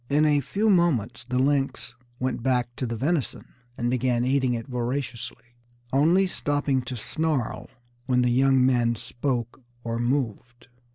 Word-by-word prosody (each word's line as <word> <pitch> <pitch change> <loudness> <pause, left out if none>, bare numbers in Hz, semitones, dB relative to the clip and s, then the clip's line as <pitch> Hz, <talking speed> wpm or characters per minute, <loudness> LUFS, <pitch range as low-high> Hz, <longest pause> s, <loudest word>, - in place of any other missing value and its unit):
In 150 +2 +3
a 150 -1 +4
few 200 - -1
moments 165 - +1
the 125 0 -2
lynx 135 +1 0 0.3
went 130 -2 -2
back 125 -1 0
to 130 - -2
the 115 - -3
venison, 140 +4 -2 0.2
and 120 - -1
began 125 -1 +1
eating 130 -2 +2
it 115 - -5
voraciously, 125 -1 -4 0.4
only 165 +8 +4
stopping 145 -6 0
to 125 0 -5
snarl 150 0 -2 0.4
when 125 -1 +3
the 125 - +2
young 135 +1 +4
men 120 -2 +2
spoke 120 +2 -3 0.2
or 115 0 -3
moved. 120 -1 -2
130 Hz, 150 wpm, -25 LUFS, 120-140 Hz, 0.4 s, a